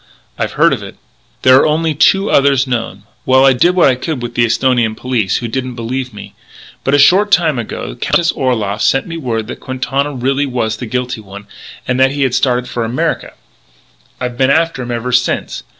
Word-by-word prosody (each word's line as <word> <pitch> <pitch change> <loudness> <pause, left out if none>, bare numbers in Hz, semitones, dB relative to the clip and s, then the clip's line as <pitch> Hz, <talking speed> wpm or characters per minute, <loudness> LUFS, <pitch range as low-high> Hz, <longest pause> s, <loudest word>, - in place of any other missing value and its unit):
"I've - - -3
heard - - +3
of - - -3
it." - - -10 0.5
"There 130 0 +7
are 140 - +4
only 160 +1 0
two 195 +7 +3
others 140 -2 +3
known.... 115 -6 -4 0.2
Well, 130 +1 +4
I 135 - +6
did 175 +9 +2
what 180 - +5
I 130 - +4
could 130 0 -4
with 120 0 -5
the 120 0 +2
Esthonian 120 -1 +1
police, 115 -5 -1
who 120 - -4
didn't 130 +1 -4
believe 125 +2 -4
me. 105 - -11 0.5
"But 135 - +2
a - - +4
short 190 +8 +5
time 160 -7 +3
ago 115 - -5
the - - -10
Countess 170 -1 +1
Orloff 110 -5 -1
sent 135 +1 +2
me 165 - -7
word 115 -7 -3
that 120 - -8
Quintana 135 +2 -2
really 135 +3 0
was 115 -4 -2
the 120 - -6
guilty 125 -1 -3
one, 100 0 -11 0.4
and 125 +1 0
that 135 +1 +3
he 140 -1 -1
had 130 -2 0
started 125 -1 +1
for 120 - -3
America. 115 +3 -2 0.9
"I've 125 -1 -5
been 130 0 +3
after 160 -1 +1
him 120 - -6
ever 120 +1 -3
since.... 125 0 0
130 Hz, 210 wpm, -15 LUFS, 120-140 Hz, 0.9 s, There